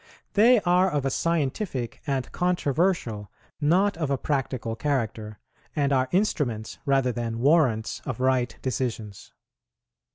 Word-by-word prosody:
They 230 +3 +6
are 180 +1 +3
of 145 -5 -1
a 135 - +1
scientific 150 - -2
and 135 -3 -2
controversial, 165 - 0 0.3
not 180 +6 +3
of 155 -4 -2
a 140 - +1
practical 130 -5 -2
character, 110 -5 -2 0.4
and 140 -2 +1
are 130 -1 +1
instruments 145 - -1
rather 135 -2 +3
than 115 -1 -3
warrants 125 -5 +2
of - - -5
right 130 -1 +1
decisions. 115 -6 -4
135 Hz, 125 wpm, -26 LUFS, 120-165 Hz, 0.4 s, They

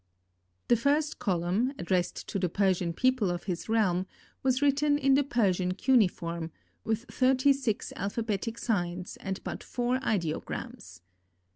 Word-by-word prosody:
The 240 - +5
first 290 +6 +1
column, 190 +6 0
addressed 175 0 -1
to 195 - -2
the 180 -1 0
Persian 185 -2 +1
people 255 +1 +2
of 175 0 -3
his 180 +1 -4
realm, 190 -5 +2 0.3
was 260 -1 +2
written 290 +1 +3
in 275 -2 +3
the 285 +1 +4
Persian 185 -8 +1
cuneiform, 175 -9 +1 0.3
with 220 +1 -1
thirty 260 +2 +3
six 255 -6 -2
alphabetic 220 +2 -2
signs 180 -5 -2
and 190 0 -5
but - - -5
four 245 +1 -1
ideograms. 170 - -3
215 Hz, 135 wpm, -29 LUFS, 180-260 Hz, 0.3 s, The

